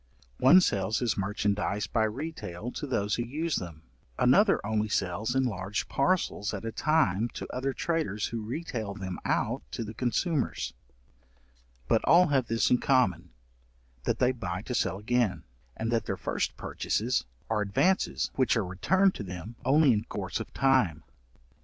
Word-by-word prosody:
One 175 Hz, +8 st, +7 dB
sells 100 Hz, -, +1 dB
his 120 Hz, -3 st, 0 dB
merchandize 100 Hz, 0 st, -1 dB
by 110 Hz, +5 st, +1 dB
retail 115 Hz, -, -5 dB
to 145 Hz, -, -5 dB
those 105 Hz, -5 st, 0 dB
who 120 Hz, -, 0 dB
use 155 Hz, +6 st, -2 dB
them, 80 Hz, -3 st, -7 dB, 0.3 s
another -, -, +4 dB
only 110 Hz, 0 st, 0 dB
sells 105 Hz, +5 st, -1 dB
in 130 Hz, -, +3 dB
large 105 Hz, -4 st, -2 dB
parcels 135 Hz, -, 0 dB
at 105 Hz, -, -6 dB
a 115 Hz, -, -2 dB
time, 120 Hz, -, +2 dB
to -, -, -5 dB
other 135 Hz, +2 st, -1 dB
traders 135 Hz, -10 st, -1 dB
who 115 Hz, -1 st, -4 dB
retail 110 Hz, -4 st, -4 dB
them 95 Hz, -3 st, -5 dB
out -, -, 0 dB
to -, -, -3 dB
the 110 Hz, 0 st, -7 dB
consumers: 130 Hz, -, -1 dB, 1.1 s
but 110 Hz, -, +2 dB
all 175 Hz, +1 st, +6 dB
have 135 Hz, -4 st, +2 dB
this 115 Hz, 0 st, +1 dB
in 125 Hz, -, +5 dB
common 95 Hz, -, +2 dB, 0.8 s
that -, -, +1 dB
they 125 Hz, 0 st, +3 dB
buy 90 Hz, -6 st, -4 dB
to 125 Hz, -, -5 dB
sell 95 Hz, -5 st, 0 dB
again, 110 Hz, 0 st, 0 dB, 0.3 s
and 115 Hz, +1 st, -2 dB
that 115 Hz, -1 st, 0 dB
their -, -, -2 dB
first -, -, -2 dB
purchases 120 Hz, +4 st, -1 dB, 0.2 s
are 110 Hz, -1 st, 0 dB
advances 175 Hz, -, +1 dB
which 130 Hz, -2 st, +2 dB
are 110 Hz, -, 0 dB
returned 185 Hz, -, +2 dB
to -, -, -6 dB
them 90 Hz, +4 st, -7 dB
only 140 Hz, 0 st, +5 dB
in 105 Hz, -, -1 dB
course -, -, -4 dB
of -, -, -7 dB
time. 130 Hz, -, +2 dB
115 Hz, 165 wpm, -29 LUFS, 100-130 Hz, 1.1 s, One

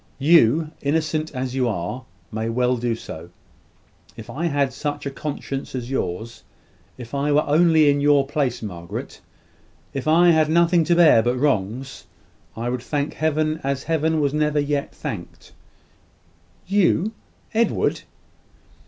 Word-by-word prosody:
You, 155 Hz, +1 st, +4 dB
innocent 155 Hz, +1 st, -1 dB
as 130 Hz, 0 st, -3 dB
you 130 Hz, -2 st, +1 dB
are, 110 Hz, +5 st, -4 dB, 0.3 s
may 110 Hz, +1 st, -3 dB
well 125 Hz, +2 st, +1 dB
do 120 Hz, -1 st, -1 dB
so. 85 Hz, -6 st, -9 dB, 0.9 s
If -, -, -9 dB
I 170 Hz, +5 st, -2 dB
had 140 Hz, -4 st, 0 dB
such 145 Hz, +1 st, -4 dB
a 140 Hz, -, -3 dB
conscience 135 Hz, -1 st, -5 dB
as 125 Hz, 0 st, -5 dB
yours 110 Hz, -1 st, -4 dB, 0.5 s
if 120 Hz, -1 st, -10 dB
I 140 Hz, +1 st, 0 dB
were 150 Hz, +1 st, +4 dB
only 160 Hz, 0 st, +4 dB
in 145 Hz, 0 st, +3 dB
your 145 Hz, -1 st, +4 dB
place, 140 Hz, -4 st, -2 dB
Margaret 85 Hz, -5 st, -7 dB, 0.7 s
if 135 Hz, +1 st, -4 dB
I 170 Hz, +3 st, +5 dB
had 155 Hz, -1 st, +3 dB
nothing 170 Hz, +1 st, +4 dB
to 175 Hz, -, +3 dB
bear 160 Hz, -9 st, +6 dB
but 120 Hz, +2 st, 0 dB
wrongs, 130 Hz, -1 st, -2 dB, 0.5 s
I 115 Hz, +1 st, -3 dB
would 125 Hz, 0 st, -2 dB
thank 145 Hz, +3 st, -2 dB
Heaven 155 Hz, 0 st, 0 dB
as 135 Hz, 0 st, -2 dB
Heaven 160 Hz, 0 st, 0 dB
was 145 Hz, -1 st, +1 dB
never 150 Hz, -1 st, +1 dB
yet 145 Hz, -1 st, -1 dB
thanked." -, -, -8 dB, 1.1 s
"You, 195 Hz, +1 st, +2 dB, 0.4 s
Edward!" 230 Hz, +1 st, +1 dB
145 Hz, 145 wpm, -22 LUFS, 125-155 Hz, 1.1 s, bear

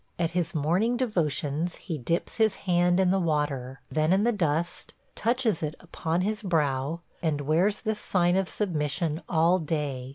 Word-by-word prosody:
At 170 Hz, -1 st, 0 dB
his 175 Hz, +1 st, -1 dB
morning 180 Hz, +11 st, +1 dB
devotions 165 Hz, -, 0 dB
he 165 Hz, -6 st, -5 dB
dips 165 Hz, +8 st, -2 dB
his 220 Hz, -3 st, +3 dB
hand 175 Hz, 0 st, +3 dB
in 185 Hz, -1 st, +4 dB
the 195 Hz, -, +2 dB
water, 145 Hz, -6 st, -1 dB
then 155 Hz, +1 st, +2 dB
in 195 Hz, +2 st, +4 dB
the 240 Hz, -, +3 dB
dust, 170 Hz, -4 st, -2 dB, 0.2 s
touches 230 Hz, -5 st, +1 dB
it 155 Hz, 0 st, -3 dB
upon 170 Hz, -1 st, -2 dB
his 210 Hz, +2 st, -1 dB
brow, 155 Hz, -4 st, 0 dB, 0.2 s
and 155 Hz, -3 st, 0 dB
wears 170 Hz, +8 st, +1 dB
this 220 Hz, -2 st, -2 dB
sign 175 Hz, -3 st, +2 dB
of 190 Hz, -1 st, +1 dB
submission 160 Hz, -3 st, -1 dB
all 170 Hz, +2 st, +3 dB
day. 145 Hz, -5 st, -3 dB
170 Hz, 165 wpm, -27 LUFS, 150-190 Hz, 0.2 s, in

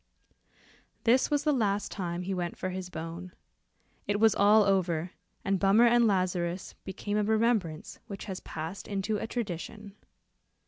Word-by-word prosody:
'" -, -, -30 dB, 0.3 s
This 245 Hz, +3 st, +4 dB
was 290 Hz, -1 st, +1 dB
the 300 Hz, -, +3 dB
last 205 Hz, -5 st, 0 dB
time 175 Hz, -2 st, -3 dB
he 195 Hz, +2 st, -2 dB
went 175 Hz, -2 st, -3 dB
for 185 Hz, -, -3 dB
his 185 Hz, -1 st, -5 dB
bone. 170 Hz, +2 st, -7 dB, 0.7 s
It 205 Hz, 0 st, 0 dB
was 220 Hz, -1 st, +5 dB
all 210 Hz, +2 st, +5 dB
over, 180 Hz, -4 st, +1 dB, 0.3 s
and 195 Hz, -1 st, +1 dB
Bummer 200 Hz, +5 st, +5 dB
and 240 Hz, 0 st, +5 dB
Lazarus 180 Hz, -2 st, -1 dB
became 205 Hz, +2 st, -3 dB
a -, -, +2 dB
remembrance 215 Hz, -7 st, 0 dB
which 200 Hz, -1 st, -7 dB
has 190 Hz, -2 st, -5 dB
passed 160 Hz, +5 st, -6 dB
into 205 Hz, +1 st, -1 dB
a 225 Hz, -, -4 dB
tradition. 210 Hz, -2 st, -5 dB
195 Hz, 155 wpm, -29 LUFS, 180-215 Hz, 0.7 s, was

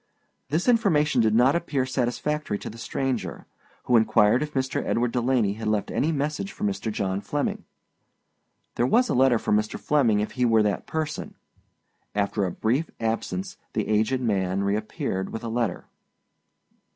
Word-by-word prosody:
This 160 Hz, -, 0 dB
information 165 Hz, -, +3 dB
did 110 Hz, -1 st, +2 dB
not 125 Hz, +5 st, +5 dB
appear 145 Hz, -6 st, 0 dB
satisfactory 130 Hz, 0 st, -1 dB
to -, -, -7 dB
the 115 Hz, -, -12 dB
stranger, 130 Hz, +2 st, -3 dB, 0.4 s
who 125 Hz, -, +2 dB
inquired 110 Hz, +2 st, +4 dB
if 150 Hz, -1 st, -4 dB
Mr. 130 Hz, 0 st, -1 dB
Edward 120 Hz, 0 st, 0 dB
Delaney 120 Hz, -4 st, +1 dB
had 110 Hz, +1 st, -5 dB
left 105 Hz, -1 st, 0 dB
any 155 Hz, -, +1 dB
message 150 Hz, +6 st, -2 dB
for -, -, -8 dB
Mr. 195 Hz, -, -1 dB
John 100 Hz, -1 st, -2 dB
Flemming. 145 Hz, +6 st, -2 dB, 1.1 s
There 120 Hz, -, +2 dB
was 245 Hz, -, +3 dB
a -, -, +1 dB
letter 130 Hz, -1 st, +4 dB
for -, -, -3 dB
Mr. 105 Hz, 0 st, 0 dB
Flemming 125 Hz, -8 st, +2 dB
if 105 Hz, -, -2 dB
he 125 Hz, -, -1 dB
were 115 Hz, -2 st, +4 dB
that 105 Hz, -1 st, -1 dB
person. 155 Hz, -1 st, -4 dB, 0.8 s
After 100 Hz, 0 st, 0 dB
a -, -, -3 dB
brief 125 Hz, -, 0 dB
absence 115 Hz, +12 st, -2 dB, 0.2 s
the 110 Hz, -, -1 dB
aged 110 Hz, +5 st, +1 dB
man 95 Hz, -4 st, 0 dB
reappeared 100 Hz, -2 st, -2 dB
with 115 Hz, -, -6 dB
a 115 Hz, -, -3 dB
Letter. 115 Hz, -5 st, -2 dB
120 Hz, 165 wpm, -25 LUFS, 105-145 Hz, 1.1 s, not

